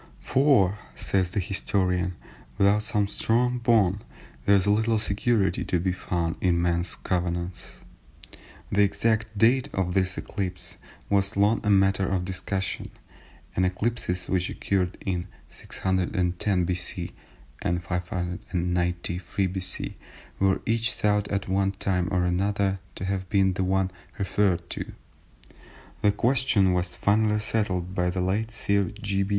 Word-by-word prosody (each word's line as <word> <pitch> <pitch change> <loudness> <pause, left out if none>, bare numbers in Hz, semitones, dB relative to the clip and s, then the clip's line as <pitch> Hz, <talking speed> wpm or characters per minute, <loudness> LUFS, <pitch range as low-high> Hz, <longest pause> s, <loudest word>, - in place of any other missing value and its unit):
"For 120 -8 +3 0.2
(says 95 -2 0
the 95 - -1
historian) 90 -1 0 0.4
without 100 +1 +4
some 105 -1 +1
strong 125 +4 +1
bond, 105 -5 +3 0.4
there 100 - +7
is 95 -1 +3
little 110 +2 +3
security 105 -2 +1
to 90 - +1
be 95 +2 0
found 85 -2 -2
in 90 -2 +3
men's 85 0 0
covenants." 90 0 -3 0.9
The 105 - +3
exact 110 +1 +1
date 125 +6 +4
of 90 -2 -1
this 95 -1 +1
eclipse 90 -3 -4 0.3
was 100 0 +1
long 105 +3 +3
a 105 - 0
matter 95 -1 +3
of 95 -2 0
discussion, 95 +1 -3 0.7
and 95 - +2
eclipses 90 -1 -1
which 90 -1 0
occurred 95 -2 -1
in 90 -1 -1 0.2
610 90 0 0
B.C. 90 0 -3 0.5
and 85 0 -1
593 90 +1 -2
B.C. 95 0 -4 0.4
were 95 0 +2
each 115 +2 +1
thought 105 -1 +1
at 100 -1 -2
one 95 +1 +1
time 95 -2 0
or 90 -2 +1
another 95 +2 +1 0.2
to 95 - -5
have 95 -1 -2
been 95 -2 +3
the 95 - -1
one 95 0 +1 0.3
referred 95 -3 +1
to. - - -5 1.1
The 105 - +5
question 115 -6 +3
was 90 0 -1
finally 105 +1 +2
settled 95 -5 -1
by 90 -1 +1
the 90 +1 -1
late 100 +5 0
Sir 100 -3 +1
G. 100 -1 -1
95 Hz, 135 wpm, -26 LUFS, 90-105 Hz, 1.1 s, there